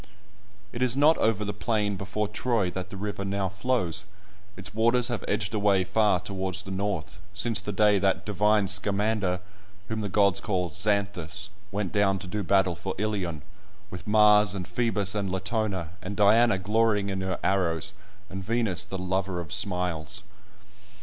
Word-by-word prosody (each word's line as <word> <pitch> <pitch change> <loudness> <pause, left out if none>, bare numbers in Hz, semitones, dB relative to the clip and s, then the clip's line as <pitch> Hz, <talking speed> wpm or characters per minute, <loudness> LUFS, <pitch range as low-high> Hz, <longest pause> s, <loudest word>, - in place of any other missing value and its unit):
It 120 - -5
is 125 -1 +2
not 150 +3 +5
over 110 -2 +1
the 105 - -3
plain 105 -1 -1
before 100 +2 -2
Troy 105 -3 0
that 95 +1 -5
the 100 - -8
river 100 0 -4
now 100 -1 -1
flows; 105 -3 -1 0.5
its 95 +1 -3
waters 120 +3 +3
have 120 - -3
edged 100 0 -1
away 100 -3 +3
far 105 -1 +2
towards 95 0 -4
the 95 - -8
north, 95 -3 -3 0.2
since 115 +1 +2
the 105 - -4
day 105 0 +4
that 95 -1 +1
"divine 105 0 +2
Scamander" 100 -1 +1 0.5
(whom 110 0 -2
the 105 - -3
gods 100 -2 +3
call 90 -5 -2
Xanthus) 100 +1 0 0.2
went 100 -2 -2
down 100 -1 +2
to 95 - -8
do 105 +3 -3
battle 95 -2 +2
for 95 +4 -5
Ilion, 95 -7 -2 0.5
"with 90 +1 -8
Mars, 105 -2 +5
and 90 -2 -5
Phoebus, 105 -5 0
and 100 -3 -2
Latona, 95 -3 -2
and 100 +3 -5
Diana 110 +1 +5
glorying 105 +1 +1
in 95 0 -3
her 95 -1 -2
arrows, 90 -2 0 0.3
and 95 0 -6
Venus 115 -3 +1
the 95 - -5
lover 95 0 -2
of 85 -3 -5
smiles." 90 -2 -1
100 Hz, 165 wpm, -27 LUFS, 95-105 Hz, 0.5 s, not